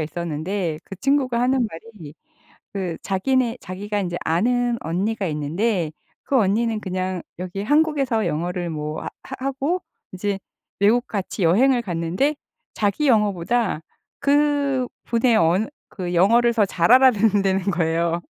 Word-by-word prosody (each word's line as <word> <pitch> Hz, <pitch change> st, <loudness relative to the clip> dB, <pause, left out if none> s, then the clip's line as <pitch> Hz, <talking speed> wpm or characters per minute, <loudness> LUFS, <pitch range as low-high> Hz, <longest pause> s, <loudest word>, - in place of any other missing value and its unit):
있었는데 165 Hz, +2 st, -3 dB
그 -, -, -8 dB
친구가 265 Hz, -2 st, +1 dB
하는 250 Hz, -1 st, +2 dB
말이 165 Hz, -4 st, -11 dB, 0.6 s
그 185 Hz, -4 st, -3 dB
자기네 240 Hz, +5 st, 0 dB
자기가 205 Hz, +3 st, -4 dB
이제 175 Hz, -3 st, -3 dB
아는 240 Hz, +8 st, +1 dB
언니가 195 Hz, +6 st, -1 dB
있는데 165 Hz, +4 st, -1 dB, 0.3 s
그 275 Hz, -, +1 dB
언니는 220 Hz, +2 st, +1 dB
그냥 185 Hz, -2 st, -3 dB, 0.2 s
여기 185 Hz, +2 st, -4 dB
한국에서 275 Hz, -3 st, +2 dB
영어를 175 Hz, +2 st, -2 dB
뭐 150 Hz, -1 st, -4 dB
하 -, -, -4 dB, 0.2 s
하 265 Hz, 0 st, -6 dB
하고 280 Hz, +7 st, -1 dB, 0.3 s
이제 195 Hz, +1 st, -2 dB, 0.4 s
외국 235 Hz, +5 st, +3 dB
같이 200 Hz, 0 st, -3 dB
여행을 240 Hz, +9 st, +4 dB
갔는데 180 Hz, -, -1 dB, 0.4 s
자기 215 Hz, +8 st, 0 dB
영어보다 210 Hz, -3 st, +1 dB, 0.4 s
그분의 280 Hz, -5 st, +1 dB
언 175 Hz, +6 st, +2 dB, 0.2 s
그 180 Hz, -2 st, -5 dB
영어를 235 Hz, +7 st, +4 dB
더 220 Hz, -3 st, +4 dB
잘 170 Hz, +1 st, +1 dB
알아듣는다는 210 Hz, -7 st, +4 dB
거예요. 170 Hz, 0 st, 0 dB
205 Hz, 280 characters per minute, -22 LUFS, 175-245 Hz, 0.6 s, 여행을